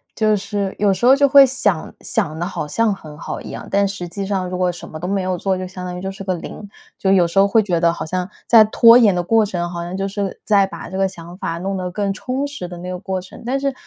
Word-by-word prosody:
就 215 Hz, -1 st, +2 dB
是 200 Hz, -1 st, -3 dB
有 205 Hz, -1 st, +3 dB
时 190 Hz, +5 st, -2 dB
候 260 Hz, +2 st, +7 dB
就 280 Hz, 0 st, +4 dB
会 275 Hz, 0 st, +8 dB
想 205 Hz, -10 st, -1 dB
想 155 Hz, +1 st, -2 dB
得 175 Hz, -, -1 dB
好 175 Hz, -5 st, -4 dB
像 225 Hz, +7 st, +1 dB
很 155 Hz, -6 st, -11 dB
好 -, -, -6 dB
一 -, -, -9 dB
样， -, -, -8 dB
但 200 Hz, 0 st, +3 dB
实 195 Hz, -3 st, -5 dB
际 195 Hz, +3 st, -5 dB
上 190 Hz, -2 st, -2 dB
如 180 Hz, -, -4 dB
果 180 Hz, -1 st, +1 dB
什 175 Hz, -, -10 dB
么 155 Hz, -, -8 dB
都 175 Hz, -, -4 dB
没 195 Hz, 0 st, 0 dB
有 185 Hz, -1 st, -2 dB
做， 190 Hz, +1 st, -1 dB
就 185 Hz, 0 st, -5 dB
相 185 Hz, 0 st, -8 dB
当 180 Hz, 0 st, -5 dB
于 -, -, -7 dB
就 190 Hz, +1 st, -4 dB
是 195 Hz, +1 st, -9 dB
个 190 Hz, -1 st, -1 dB
0。 200 Hz, +4 st, -9 dB, 0.3 s
就 190 Hz, -, +1 dB
有 180 Hz, -3 st, +4 dB
时 170 Hz, +4 st, +1 dB
候 200 Hz, -, +5 dB
会 220 Hz, +3 st, +4 dB
觉 180 Hz, -4 st, 0 dB
得 170 Hz, 0 st, +3 dB
好 -, -, -5 dB
像 180 Hz, +3 st, -3 dB, 0.2 s
在 230 Hz, -2 st, +8 dB
拖 230 Hz, +2 st, +7 dB
延 220 Hz, -5 st, +5 dB
的 175 Hz, -, 0 dB
过 220 Hz, +4 st, +3 dB
程， 175 Hz, -4 st, -3 dB
好 170 Hz, -1 st, -5 dB
像 175 Hz, +2 st, -6 dB
就 195 Hz, +1 st, -2 dB
是 200 Hz, -1 st, -4 dB
在 200 Hz, -2 st, +4 dB
把 195 Hz, -, -9 dB
这 190 Hz, -, -5 dB
个 195 Hz, 0 st, +2 dB
想 175 Hz, -1 st, -11 dB
法， 165 Hz, -3 st, -3 dB
弄 195 Hz, +2 st, -3 dB
得 180 Hz, -1 st, -4 dB
更 200 Hz, +1 st, -1 dB
充 255 Hz, +7 st, -3 dB
实 285 Hz, -11 st, -7 dB
的 175 Hz, 0 st, -9 dB
那 180 Hz, +1 st, -7 dB
个 180 Hz, 0 st, -5 dB
过 190 Hz, 0 st, -3 dB
程， 185 Hz, -, -13 dB
但 265 Hz, +3 st, 0 dB
是， 275 Hz, 0 st, -1 dB
190 Hz, 310 characters per minute, -19 LUFS, 180-205 Hz, 0.3 s, 会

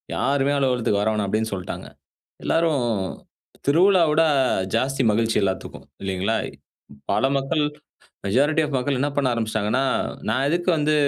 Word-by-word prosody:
யாருமே 135 Hz, +4 st, +1 dB
அலுவலகத்துக்கு 125 Hz, -6 st, +1 dB
வரவேணாம் 105 Hz, -1 st, 0 dB
அப்படின்னு 110 Hz, +2 st, -1 dB
சொல்ட்டாங்க. 90 Hz, -2 st, -6 dB, 0.6 s
எல்லாரும் 160 Hz, -5 st, +1 dB, 0.8 s
திருவிழாவ 175 Hz, +3 st, +5 dB
விட 165 Hz, +2 st, +4 dB, 0.5 s
ஜாஸ்தி 135 Hz, +3 st, 0 dB
மகிழ்ச்சி 115 Hz, +1 st, +1 dB
எல்லாத்துக்கும். 95 Hz, -1 st, -4 dB, 0.2 s
இல்லீங்களா? 95 Hz, +3 st, -1 dB, 0.8 s
பல -, -, +1 dB
மக்கள், 150 Hz, +3 st, 0 dB, 0.6 s
மெஜாரிட்டி 145 Hz, +10 st, +2 dB
ஆஃப் 140 Hz, -2 st, -2 dB
மக்கள் 130 Hz, +1 st, -1 dB
என்ன 145 Hz, +2 st, +1 dB
பண்ண 140 Hz, -2 st, +2 dB
ஆரம்பிச்சிட்டாங்கன்னா, 110 Hz, +2 st, 0 dB, 0.4 s
"நான் 130 Hz, +5 st, +1 dB
எதுக்கு 175 Hz, +3 st, -1 dB
வந்து 155 Hz, 0 st, +1 dB
130 Hz, 125 wpm, -23 LUFS, 110-145 Hz, 0.8 s, திருவிழாவ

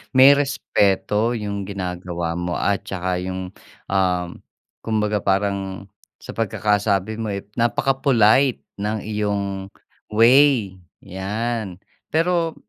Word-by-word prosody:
May 135 Hz, +2 st, +9 dB
respeto 105 Hz, -4 st, +1 dB
yung 100 Hz, -2 st, -4 dB
ginagawa 90 Hz, -3 st, -4 dB
mo 90 Hz, 0 st, -2 dB
at 100 Hz, 0 st, 0 dB
tsaka 90 Hz, -1 st, -2 dB
yung, 95 Hz, 0 st, -5 dB, 0.4 s
um, 90 Hz, -2 st, +1 dB, 0.5 s
kumbaga 105 Hz, -1 st, 0 dB
parang 100 Hz, -1 st, -1 dB, 0.3 s
sa -, -, -8 dB
pagkakasabi 105 Hz, -1 st, 0 dB
mo, 110 Hz, -, -3 dB
eh, 100 Hz, -, -4 dB, 0.2 s
napaka-polite 130 Hz, 0 st, +3 dB, 0.2 s
ng 105 Hz, 0 st, -2 dB
iyong 100 Hz, -2 st, -2 dB, 0.5 s
way 115 Hz, -4 st, +4 dB, 0.2 s
yan. 105 Hz, +1 st, -3 dB, 0.4 s
Pero 165 Hz, 0 st, +1 dB
100 Hz, 100 wpm, -22 LUFS, 95-115 Hz, 0.5 s, May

